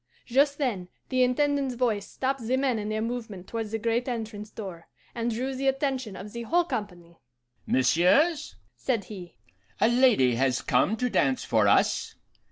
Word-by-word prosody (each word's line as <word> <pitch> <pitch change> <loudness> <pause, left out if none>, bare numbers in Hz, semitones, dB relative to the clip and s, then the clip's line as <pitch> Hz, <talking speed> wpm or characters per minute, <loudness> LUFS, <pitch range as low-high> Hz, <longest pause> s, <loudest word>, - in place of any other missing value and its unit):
"Just 280 +3 +2
then 220 -11 -2 0.2
the 255 -1 +1
Intendant's 275 +1 +1
voice 225 -5 0
stopped 270 0 -2
the 255 +2 +2
men 260 -4 +1
in 210 0 -4
their 215 0 -1
movement 225 -6 -5
towards 225 0 -4
the 225 - -2
great 230 +3 -1
entrance 220 -3 -5
door, 185 -7 -8 0.3
and 235 0 -2
drew 250 +4 -2
the 270 +1 -2
attention 265 -5 -1
of 200 +2 -9
the 235 - -5
whole 340 +9 +2
company. 180 - -6 0.5
'Messieurs,' 275 - +3 0.2
said 235 -6 -1
he, 185 -3 -10 0.4
'a 220 - +4
lady 240 - +4
has 130 +1 +1
come 220 - +2
to 250 - 0
dance 135 - +1
for 110 -3 +3
us. - - +2
230 Hz, 170 wpm, -27 LUFS, 200-260 Hz, 0.5 s, a